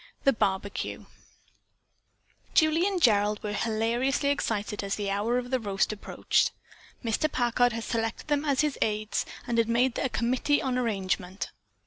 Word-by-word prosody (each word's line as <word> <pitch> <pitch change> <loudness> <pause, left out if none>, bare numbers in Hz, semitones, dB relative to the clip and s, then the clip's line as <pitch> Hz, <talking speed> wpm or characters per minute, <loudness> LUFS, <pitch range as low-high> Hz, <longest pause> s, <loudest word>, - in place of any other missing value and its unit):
THE 275 - +5
BARBEQUE 200 -2 -2 1.5
Julie 320 +3 +4
and 390 -3 0
Gerald 210 -6 +3
were 210 -1 -2
hilariously 235 +6 0
excited 210 -7 -1
as 200 0 -1
the 200 -2 -2
hour 215 +5 +1
of 250 0 -4
the 260 - +2
roast 200 -2 0
approached. 205 - +1 0.5
Mr. 250 +7 +1
Packard 245 0 +2
had 230 0 -4
selected 225 +2 -2
them 290 -1 +1
as 285 -3 +2
his 300 -2 -1
aides, 215 0 0 0.2
had 230 -1 +1
made 240 +2 +3
them 270 - -2
a - - -10
committee 255 +5 +1
on 260 -3 -1
arrangement. 195 -5 -2
230 Hz, 150 wpm, -28 LUFS, 210-265 Hz, 1.5 s, THE